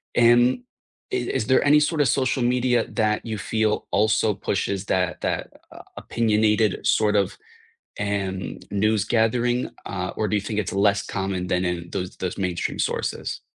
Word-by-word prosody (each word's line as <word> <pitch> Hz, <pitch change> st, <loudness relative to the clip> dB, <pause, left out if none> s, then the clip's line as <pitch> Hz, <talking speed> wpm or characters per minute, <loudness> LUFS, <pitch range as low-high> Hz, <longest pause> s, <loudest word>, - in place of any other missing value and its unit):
and 120 Hz, -, +5 dB, 0.5 s
i -, -, +2 dB
is 125 Hz, -, -2 dB
there 130 Hz, -, +4 dB
any 150 Hz, 0 st, +6 dB
sort 150 Hz, +1 st, 0 dB
of 145 Hz, -, +4 dB
social 130 Hz, +2 st, +1 dB
media 125 Hz, -2 st, +2 dB
that 110 Hz, -2 st, 0 dB
you 110 Hz, -2 st, -3 dB
feel 110 Hz, +2 st, 0 dB
also 110 Hz, +1 st, +2 dB
pushes 100 Hz, 0 st, -2 dB
that 90 Hz, -3 st, 0 dB
that, -, -, -2 dB, 0.3 s
uh, -, -, -11 dB, 0.2 s
opinionated 110 Hz, -2 st, +1 dB
sort 105 Hz, -1 st, +3 dB
of, 100 Hz, -2 st, 0 dB, 0.6 s
um, 95 Hz, -2 st, -3 dB
news 105 Hz, +1 st, +2 dB
gathering? 120 Hz, +2 st, +1 dB, 0.2 s
Uh, 90 Hz, -1 st, -3 dB
or 110 Hz, -, 0 dB
do 100 Hz, -, -1 dB
you -, -, +1 dB
think 105 Hz, 0 st, -3 dB
it's 105 Hz, -, -2 dB
less 100 Hz, 0 st, +2 dB
common 95 Hz, -2 st, -3 dB
than 90 Hz, +1 st, +1 dB
in 90 Hz, -1 st, -3 dB
those 90 Hz, 0 st, -4 dB
those 90 Hz, -1 st, -4 dB
mainstream 90 Hz, -2 st, -2 dB
sources? -, -, -2 dB
105 Hz, 165 wpm, -24 LUFS, 95-115 Hz, 0.6 s, any